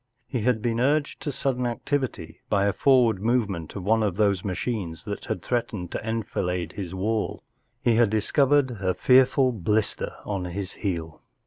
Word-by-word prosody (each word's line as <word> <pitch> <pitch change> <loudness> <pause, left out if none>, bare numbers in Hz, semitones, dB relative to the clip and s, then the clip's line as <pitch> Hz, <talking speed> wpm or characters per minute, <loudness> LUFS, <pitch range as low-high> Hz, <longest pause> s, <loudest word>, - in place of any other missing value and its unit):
He 125 -5 -2
had 115 -1 +1
l>een 115 -1 0
urged 145 +3 +1
to 145 - -2
sudden 125 -2 -1
activity 120 - -3
by 100 -1 +2
a 100 - +2
forward 120 -7 +4
movement 105 -8 0
of 95 - -5
one 110 +3 +3
of 100 -5 0
those 100 -2 +2
machines 95 -4 -3
that - - -5
had - - -3
threatened 110 -7 -2
to - - -4
enfilade 95 -5 -2
his 95 -2 -6
wall. 110 +3 -1 0.4
He 120 - +4
had 115 -3 +5
discovered 135 +5 +3
a 95 -5 -1
fear¬ 130 0 +6
ful 130 -1 +2
blister 105 0 -1
on 100 -3 -2
his 95 +2 -4
heel. 85 -6 -4
110 Hz, 175 wpm, -25 LUFS, 95-125 Hz, 0.4 s, fear¬